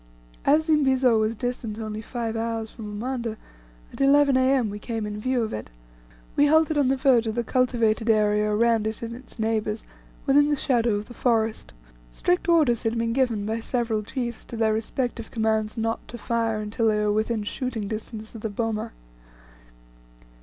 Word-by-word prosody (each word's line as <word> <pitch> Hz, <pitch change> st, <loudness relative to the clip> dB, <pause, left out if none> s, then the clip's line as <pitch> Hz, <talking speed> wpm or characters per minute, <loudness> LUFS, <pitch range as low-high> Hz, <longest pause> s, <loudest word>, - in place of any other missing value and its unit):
As 305 Hz, +3 st, +4 dB
Zimbizo 265 Hz, -7 st, +3 dB
was 220 Hz, +1 st, 0 dB
distant 235 Hz, -2 st, -4 dB
only 215 Hz, -1 st, -5 dB
five 230 Hz, -1 st, -4 dB
hours 225 Hz, -1 st, -2 dB
from 220 Hz, -3 st, -8 dB
Umanda, 235 Hz, +1 st, -3 dB, 0.6 s
at -, -, -6 dB
11 280 Hz, 0 st, +5 dB
A.M. 260 Hz, -4 st, +3 dB
we 205 Hz, -, -6 dB
came 225 Hz, -1 st, -4 dB
in 210 Hz, 0 st, -5 dB
view 255 Hz, 0 st, +1 dB
of 220 Hz, -, -4 dB
it. 110 Hz, -, -5 dB, 0.7 s
We 290 Hz, -, +5 dB
halted 315 Hz, +1 st, +4 dB
on 285 Hz, -3 st, +3 dB
the 265 Hz, +1 st, +2 dB
verge 255 Hz, -4 st, +3 dB
of 220 Hz, -, -2 dB
the 240 Hz, -, 0 dB
cultivated 230 Hz, -3 st, +1 dB
area 210 Hz, -1 st, +3 dB
around 225 Hz, 0 st, +2 dB
it 220 Hz, +1 st, -4 dB
and 230 Hz, 0 st, -5 dB
its 255 Hz, +1 st, -13 dB
neighbours 220 Hz, -1 st, -1 dB, 0.4 s
within 290 Hz, +1 st, +5 dB
the 295 Hz, -, +2 dB
shadow 240 Hz, -5 st, +1 dB
of 205 Hz, +1 st, -3 dB
the 240 Hz, -, -12 dB
forest. 225 Hz, -3 st, 0 dB, 0.4 s
Strict 355 Hz, -, 0 dB
orders 300 Hz, -9 st, +4 dB
had 225 Hz, +1 st, -1 dB
been 230 Hz, 0 st, 0 dB
given 235 Hz, -5 st, +1 dB
by 220 Hz, +1 st, -1 dB
the -, -, -5 dB
several 230 Hz, -2 st, -1 dB
chiefs 235 Hz, +1 st, -4 dB
to 235 Hz, -, -7 dB
their 220 Hz, -1 st, +2 dB
respective 230 Hz, +1 st, -3 dB
commands 220 Hz, -1 st, 0 dB
not 225 Hz, 0 st, -2 dB
to 240 Hz, -, -8 dB
fire, 230 Hz, -1 st, -1 dB
until 215 Hz, +2 st, -1 dB
they 215 Hz, -1 st, +3 dB
were 210 Hz, 0 st, +1 dB
within 220 Hz, 0 st, 0 dB
shooting 230 Hz, -1 st, -3 dB
distance 220 Hz, +1 st, -6 dB
of 225 Hz, -, -9 dB
the 220 Hz, -, -2 dB
boma. 215 Hz, +1 st, -3 dB
230 Hz, 185 wpm, -25 LUFS, 215-255 Hz, 0.7 s, 11